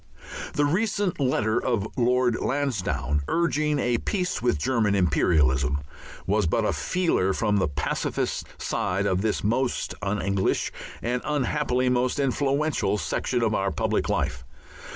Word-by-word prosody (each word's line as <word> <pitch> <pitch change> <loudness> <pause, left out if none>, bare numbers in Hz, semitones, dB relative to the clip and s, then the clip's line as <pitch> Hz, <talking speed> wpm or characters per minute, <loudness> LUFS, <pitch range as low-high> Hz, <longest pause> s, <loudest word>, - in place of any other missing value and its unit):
The 145 - +2
recent 195 +2 0
letter 120 -4 +1
of 115 -4 0
Lord 125 -1 +2
Lansdowne, 120 - -1
urging 155 -3 +1
a 120 -3 +1
peace 185 -3 -2
with 120 -9 +2
German 110 - +1
imperialism, 75 -6 +2 0.5
was 105 -1 +1
but - - +1
a - - +1
feeler 165 - +1
from 105 0 +1
the 95 - +2
pacifist 75 0 -2
side 95 +2 -1
of 95 -1 +1
this 110 0 -1
most 120 +5 0
un 100 +1 -1
English, 100 0 0 0.3
and 125 +1 -1
unhappily 135 -3 0
most 125 +2 +1
influential, 140 -4 +1
section 75 -7 -1
of - - +1
our - - +1
public - - -1
life. - - -1
120 Hz, 135 wpm, -25 LUFS, 100-145 Hz, 0.5 s, The